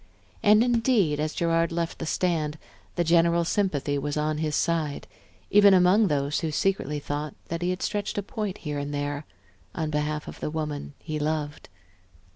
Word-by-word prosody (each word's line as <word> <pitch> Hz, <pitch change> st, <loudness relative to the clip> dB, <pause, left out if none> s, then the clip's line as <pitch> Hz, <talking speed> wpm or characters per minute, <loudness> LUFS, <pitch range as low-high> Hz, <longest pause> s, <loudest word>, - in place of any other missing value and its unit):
And 215 Hz, +1 st, +6 dB
indeed, 230 Hz, -, +2 dB
as 155 Hz, 0 st, -2 dB
Gerard 165 Hz, 0 st, +1 dB
left 165 Hz, 0 st, -2 dB
the 165 Hz, -, -4 dB
stand, 160 Hz, -4 st, 0 dB, 0.4 s
the 175 Hz, -, +2 dB
general 170 Hz, 0 st, +3 dB
sympathy 150 Hz, -7 st, 0 dB
was 145 Hz, +1 st, -3 dB
on 150 Hz, 0 st, 0 dB
his 155 Hz, -2 st, -1 dB
side, 160 Hz, -4 st, 0 dB, 0.5 s
even 200 Hz, -1 st, +7 dB
among 185 Hz, +4 st, +5 dB
those 145 Hz, -2 st, 0 dB
who 160 Hz, -, -2 dB
secretly 150 Hz, -2 st, 0 dB
thought 145 Hz, 0 st, -4 dB
that 170 Hz, +1 st, -3 dB
he 175 Hz, -, 0 dB
had 185 Hz, +1 st, -2 dB
stretched 205 Hz, -1 st, -2 dB
a 205 Hz, -, 0 dB
point 205 Hz, -1 st, -4 dB
here 150 Hz, -2 st, -4 dB
and 145 Hz, +1 st, -4 dB
there, 145 Hz, +1 st, -3 dB, 0.5 s
on 155 Hz, -1 st, -2 dB
behalf 150 Hz, 0 st, -2 dB
of -, -, -9 dB
the -, -, -2 dB
woman 150 Hz, -2 st, -4 dB
he 155 Hz, -1 st, -5 dB
loved. 150 Hz, -1 st, -3 dB
160 Hz, 175 wpm, -26 LUFS, 150-180 Hz, 0.5 s, even